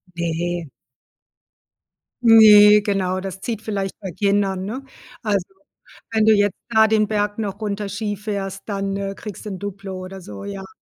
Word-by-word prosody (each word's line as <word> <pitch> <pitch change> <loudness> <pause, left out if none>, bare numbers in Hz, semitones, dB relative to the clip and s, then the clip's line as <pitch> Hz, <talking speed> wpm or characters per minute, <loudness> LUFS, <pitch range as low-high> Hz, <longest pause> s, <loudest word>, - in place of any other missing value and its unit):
Ne. 170 -1 -2 1.5
Ne, 210 -2 +8
genau, 190 -2 -1
das 190 0 -7
zieht 225 -3 -4
vielleicht 200 -3 -3
bei 190 -3 -6
Kindern, 195 0 0
ne? 255 +6 -5 0.4
Also, 200 -4 0 0.7
wenn 220 -1 +2
du 220 - +6
jetzt 205 -1 +2
da 220 -1 +5
den 215 -1 +2
Berg 205 0 -1
noch 205 -2 -4
runter 205 -1 -3
Ski 205 0 -3
fährst, 195 -2 -5
dann, 195 -1 -2
äh, 195 0 -3
kriegst 210 0 -9
du - - -4
'n 185 - -6
Duplo 195 -1 -6
oder 190 +1 -8
so, 100 - -9
ja. 195 -1 -7
200 Hz, 160 wpm, -21 LUFS, 190-210 Hz, 1.5 s, Ne